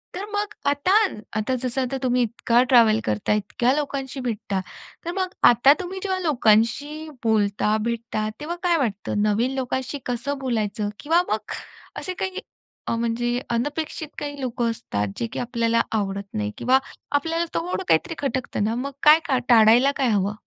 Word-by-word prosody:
तर 380 +3 -4
मग 415 0 -2 0.2
आता 285 +7 +1 0.5
आता 235 +5 0
जसं 255 +1 -1
आता 260 +1 -2
तुम्ही 250 -1 +2
इतका 235 +1 +2
ट्रॅव्हल 225 -3 +6
करता 105 - 0
इतक्या 235 +4 +1
लोकांशी 275 -2 -3
भेटता, 215 -5 -2 0.5
तर 345 - -2
मग 375 -1 -1 0.2
आता 245 +4 +6
तुम्ही 370 +1 -6
जेव्हा 380 -2 -1
लोकांशी 290 - +1
बोलता 210 -1 +2
भेटता 230 -2 -2
तेव्हा 320 +4 -4
काय 345 -2 +3
वाटतं? 210 -6 -1
नवीन 215 +5 +1
लोकांशी 260 +2 -3
कसं 255 +4 -2
बोलायचं 215 -5 -1
किंवा 330 +4 +3
मग 215 0 -2 0.5
असे 370 - -4
काही 375 0 -2 0.5
अ, - - 0
म्हणजे 235 +1 -1
अनपेक्षित 295 +6 -2
काही 290 -1 -5
लोकं 240 -2 -1
असतात 105 - -3
जे, 115 - -2
की - - -6
आपल्याला 230 -1 +1
आवडत 200 -2 -1
नाही 105 -1 -2
किंवा 260 +2 +3 0.3
आपल्याला 325 +4 0
थोडं 360 +3 -2
काहीतरी 350 -2 +2
खटकतं 265 -6 -2
ना, 220 +2 0
मग 270 +3 -3 0.2
काय-काय 300 -5 +1
टाळायला 235 +4 +6
काय 270 - +2
हवं? 200 -1 +1
245 Hz, 160 wpm, -23 LUFS, 220-290 Hz, 0.5 s, ट्रॅव्हल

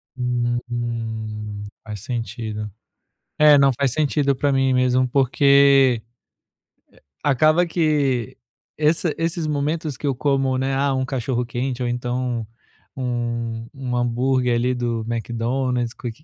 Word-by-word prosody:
Uhum, 115 -4 -3 0.2
faz 105 -3 -7
sentido. 115 -2 -4 0.7
É, 150 -1 +7
não, 140 -1 +5
faz 140 -3 +1
sentido 145 -1 +1
pra 140 +2 +1
mim 135 -1 +2
mesmo, 125 0 +2
porque 135 -1 +4 1.2
acaba 155 +5 +3
que 145 - 0 0.4
essa 155 +1 +1
esses 165 0 -1
momentos 150 0 -2
que 145 - -5
eu 140 - +1
como, 135 0 +1
né, 135 +1 0
ah, 140 0 +1
um 130 0 0
cachorro-quente 125 0 -2
ou 120 - 0
então 125 -1 -2 0.5
um, 120 -2 -3
um 130 -2 -3
hambúrguer 125 +1 +1
ali 125 +2 +1
do 120 -2 -2
McDonald's, 120 +1 -1
que 120 -3 -5
125 Hz, 120 wpm, -22 LUFS, 120-140 Hz, 1.2 s, É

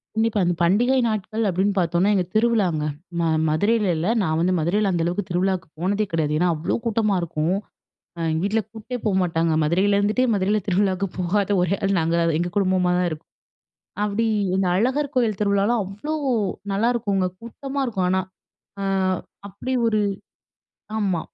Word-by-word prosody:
கண்டிப்பா. 220 -1 +1
அந்த 175 0 +1
பண்டிகை 240 +9 +3
நாட்கள் 215 +1 -2
அப்படீன்னு 190 +3 +1
பார்த்தோம்னா, 175 +3 +2
எங்க 185 -2 +1
திருவிழாங்க. 215 -9 +2 0.4
நா 170 - +1 0.2
மதுரையில 205 +7 +2
இல்ல. 165 +3 -1 0.2
நான் 160 -3 0
வந்து 180 +2 +2
மதுரையில 195 +5 +1
அந்த 170 -2 0
அளவுக்கு 180 +3 -2
திருவிழாக்கு 185 +1 0
போனதே 200 +4 0
கிடையாது. 155 -2 0
ஏன்னா 180 +1 +3
அவ்வளோ 155 +2 -1
கூட்டமா 215 -3 +1
இருக்கும். 170 +2 -1 0.6
அ - - -7
எங்க 160 +1 -1
வீட்ல 220 +2 +1
கூட்டே 225 +3 -7
போமாட்டாங்க. 175 -5 +1
மதுரையில 190 +6 +2
இருந்துட்டே 210 +5 +2
மதுரையில 205 +1 +1
திருவிழாக்கு 195 0 +1
போகாத 190 +3 0
ஒரே 180 +2 +1
ஆள் 195 0 +2
நாங்கதான் 165 0 +1
எங்க 175 +1 -1
குடும்பமா 185 -2 +2
தான் 180 0 +1
இருக்கும். 155 +1 -8 0.8
அப்படி 210 +2 0 0.3
இந்த 190 0 +1
அழகர் 265 +7 0
கோயில் 230 -6 +1
திருவிழாலாம் 205 +3 +2
அவ்வளோ 205 +11 -6 0.6
நல்லாயிருக்குங்க. 205 -3 +1
கூட்டமா 270 +4 -5
இருக்கும் 195 -7 -1
ஆனா. 190 +1 +2 0.6
அ - - -2 0.6
அப்படி 205 +6 -5
ஒரு 215 -2 +2 1.0
ஆமா. 190 -5 0
195 Hz, 150 wpm, -23 LUFS, 175-215 Hz, 1.0 s, பண்டிகை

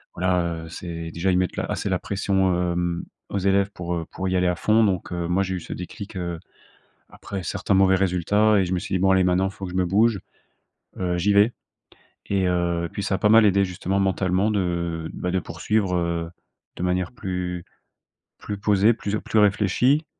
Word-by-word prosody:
Voilà, 85 -2 0
heu, - - -10
c'est 85 -1 -6
déjà 90 +4 0
ils 90 - +2
mettent 90 0 0
la - - -1
assez - - -3
la - - 0
pression, 95 -2 0 0.2
hem, 85 -1 -2 0.3
aux 100 - -2
élèves 100 +1 +2
pour, 90 -2 -4
heu, 80 - -3
pour 95 0 -4
y 95 - 0
aller 90 - +2
à 90 - +1
fond 110 +5 +3
donc 95 -3 -1
heu, 85 -1 -2
moi, 95 +3 +1
j'ai 95 0 -3
eu 90 - -3
ce - - -7
déclic, 95 +3 -8
heu, 85 -2 -4 0.7
après 95 -2 -7
certains 95 +3 -1
mauvais 95 0 +5
résultats 100 +3 +2
et 95 - +3
je 90 - -3
me 90 - +1
suis 95 - -4
dit: 95 - +2
«Bon 95 +1 +3
allez 95 -1 +4
maintenant, 90 +1 +2
faut 100 - -9
que - - -6
je 90 - -4
me 90 - +2
bouge, 105 +2 +3 0.8
heu, 90 -1 -1
j'y 100 +4 +2
vais». 105 +4 +5 0.8
Et 95 -2 +1
heu, 85 -1 0
puis 100 - -4
ça 95 -1 0
a - - -1
pas 105 - +2
mal 110 0 +7
aidé 100 0 +4
justement 95 +2 -2
mentalement 95 +1 +1
de, 105 - +1
heu, 85 -2 -2
bah, 90 - -3
de 95 - +1
poursuivre, 100 0 -1
heu, 85 -1 -1 0.5
de - - -4
manière 90 0 0
plus 90 -6 -4 0.8
plus 105 -1 -5
posée, 105 +2 +3
plus 105 -2 -3
plus 110 - 0
réfléchie. 105 - +3
95 Hz, 215 wpm, -24 LUFS, 90-100 Hz, 0.8 s, mal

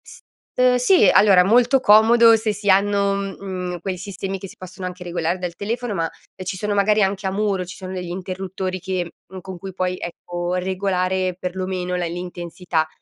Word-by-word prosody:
S - - -14 0.4
uhm, 250 0 +5
sì, 250 - +5
allora 195 -3 +6
molto 245 +5 +4
comodo 230 +1 +6
se 220 -1 -1
si 205 0 -3
hanno, 200 +1 +3
uhm, 195 -1 -3
mhmm, 180 -2 -5
quei 185 +2 -4
sistemi 195 +1 -5
che 195 - -7
si - - -14
possono 185 0 -8
anche 180 0 -8
regolare 175 0 -2
dal 180 -2 -5
telefono, 230 +2 -3
ma, 165 -4 0 0.3
ehm, 185 - -8
ci 185 +1 -3
sono 210 +2 -2
magari 210 +1 +3
anche 195 +1 -1
a - - -1
muro, 200 -2 0
ci 180 - -9
sono 185 -1 -7
degli 180 -2 -5
interruttori 185 +1 -4
che 180 -2 -3 0.3
con 190 0 -8
cui 190 +1 -8
puoi, 185 0 -2
ecco, 175 +1 -5
regolare 185 0 -1
perlomeno 185 0 -3
la 180 -1 -1
l'intensità. 175 -1 -3
190 Hz, 190 wpm, -21 LUFS, 180-200 Hz, 0.4 s, allora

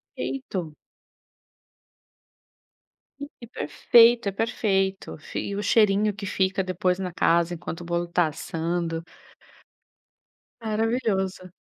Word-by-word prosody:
Perfeito. 185 - -4 2.5
Hum, 285 - -5
que 235 - -10
perfeito, 235 -2 +4
é - - -4
perfeito. 195 -2 -1
Fi 155 - -6
e 200 - -3
o 205 - -3
cheirinho 210 -1 +3
que 200 0 -7
fica 190 0 0
depois 185 0 0
na 180 -2 -3
casa, 170 0 +2
enquanto 170 0 -6
o 175 - -8
bolo 170 0 -1
tá 170 -1 +2
assando. 165 +1 -3 1.6
Maravilhoso. 215 -5 -1
190 Hz, 110 wpm, -25 LUFS, 175-215 Hz, 2.5 s, perfeito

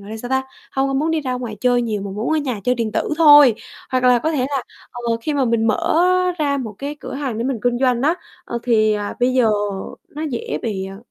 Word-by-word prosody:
gọi 200 +1 -11
là 220 - -5
sao 245 +2 -7
ta, 265 0 +1 0.3
hông 270 0 +1
có 270 - -2
muốn 305 +4 +1
đi 320 -1 0
ra 260 -3 -3
ngoài 240 -4 -5
chơi 245 -1 +2
nhiều 215 -3 -2
mà 200 - -5
muốn 215 +8 -3
ở - - +2
nhà 255 -8 -3
chơi 250 - +2
điện 230 -3 -2
tử - - -1
thôi. 290 -6 +8 0.4
Hoặc 255 -1 0
là 250 -1 +5
có 315 +7 -1
thể 300 - -1
là, 275 -3 -1 0.3
ờ, 235 -2 -2
khi 300 - -2
mà 275 -2 +2
mình 230 -1 +1
mở 270 +9 +2 0.4
ra 285 -2 +1
một 220 -5 -5
cái 285 +2 -4
cửa - - -7
hàng 270 -5 -3
để 230 - -2
mình 260 -3 -1
kinh 245 0 +1
doanh 250 -2 +1
á, 315 +5 +3 0.3
ờ, 235 - -4
thì 215 -3 +3 0.2
bây 250 +1 +3
giờ 250 -3 +4 0.6
nó 300 +2 -7
dễ 230 - -3
bị, 190 -4 -3
ờ, 195 0 -9
250 Hz, 260 wpm, -20 LUFS, 225-275 Hz, 0.6 s, thôi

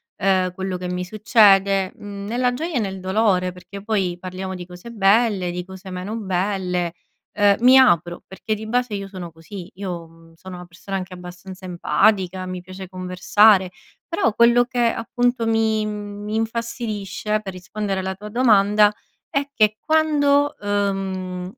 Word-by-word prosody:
ehm, 185 -2 +1
quello 190 -1 -3
che 180 0 -5
mi 180 0 -3
succede, 195 -2 +4
mhmm, 200 -1 -8
nella 245 +4 0
gioia 325 +6 -4
e - - +2
nel 195 -3 -3
dolore 190 -1 +1
perché 195 +2 -11
poi 195 -5 -1
parliamo 185 +1 -6
di 180 -1 -7
cose 180 +5 -11
belle, 205 -3 +2
di 180 +1 -4
cose 190 0 -10
meno 185 +4 -5
belle, 185 -3 -1 0.4
ehm, 205 -1 +4
mi 255 +2 +7
apro 175 -9 +3
perché 215 +3 -4
di 215 +1 -8
base 245 0 -1
io 200 -1 -5
sono 185 -3 -8
così, 170 +3 -10
io 165 -3 -8
sono 185 +2 -10
una 180 0 -9
persona 180 +3 -6
anche 185 -1 -6
abbastanza 180 +1 -10
empatica, 185 +2 +1
mi 185 0 -5
piace 185 +1 -9
conversare. 185 +2 +3 0.4
Però 335 - 0
quello 235 +2 +5
che 250 0 -5
appunto 240 +1 0
mi, 220 -1 +1
mhmm 210 -1 -5
mi 210 +1 -4
infastidisce, 220 -2 -2
per 195 -2 -6
rispondere 195 +2 -4
alla 190 0 -3
tua 210 +2 -9
domanda, 210 -3 +4 0.4
è 280 0 -1
che 215 -3 +3
quando, 290 -1 +2
uhm, 190 -3 -2
195 Hz, 160 wpm, -22 LUFS, 185-220 Hz, 0.4 s, mi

